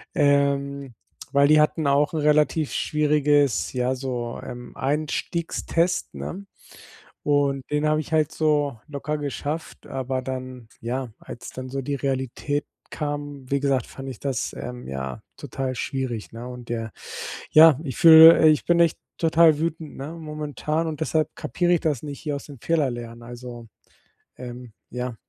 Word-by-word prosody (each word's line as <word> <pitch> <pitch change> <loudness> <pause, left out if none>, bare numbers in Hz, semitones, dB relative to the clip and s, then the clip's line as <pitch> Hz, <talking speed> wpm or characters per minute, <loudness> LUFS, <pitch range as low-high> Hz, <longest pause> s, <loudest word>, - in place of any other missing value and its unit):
Ähm, 140 -3 +1 0.4
weil 140 0 +5
die 155 +1 +6
hatten 155 0 +1
auch 145 +4 +3
'n - - 0
relativ 150 0 +2
schwieriges, 145 -4 +2
ja 125 +1 0
so, 125 -3 -4
ähm, 120 -1 -9
Einstiegstest, 165 +4 -1
ne? 195 +2 -6 0.8
Und 140 -2 +2
den 150 +1 +1
habe 155 0 +2
ich 155 - -8
halt 155 -1 +2
so 145 -5 +1
locker 150 +1 -3
geschafft, 145 +2 -5
aber 130 0 -3
dann 130 -2 -6
ja, 125 +1 -3
als - - -9
dann 130 0 -6
so 135 +1 -3
die 140 +2 -2
Realität 135 +2 -2 0.2
kam, 145 -3 -5
wie 140 0 +1
gesagt, 135 -3 +1
fand 135 0 -9
ich 125 - -9
das, 135 -4 -2
ähm, 125 0 -7
ja, 65 -1 -5 0.2
total 130 -1 -4
schwierig, 130 -4 -3
ne? 115 +2 -8
Und 125 -1 -9
der 115 -2 -3 0.6
ja, 155 -2 +8
ich 135 -6 -5
fühle, 160 0 +10
äh 155 - +7
ich 155 - +3
bin 170 0 +3
echt 170 -2 +3 0.2
total 165 -1 +5
wütend, 160 -1 -3
ne, 140 +4 -6
momentan 155 0 -3
und 155 -2 -4
deshalb 155 -1 +1
kapiere 175 0 0
ich 170 - +3
das 150 -6 -1
nicht 145 -2 -6
hier 150 -3 -3
aus - - -10
den 140 -4 -12
Fehler 150 -1 +1
lernen, 120 0 -8
also, 120 -1 -9 0.7
ähm, 125 -2 -9 0.2
ja. 125 0 -4
140 Hz, 160 wpm, -24 LUFS, 125-155 Hz, 0.8 s, fühle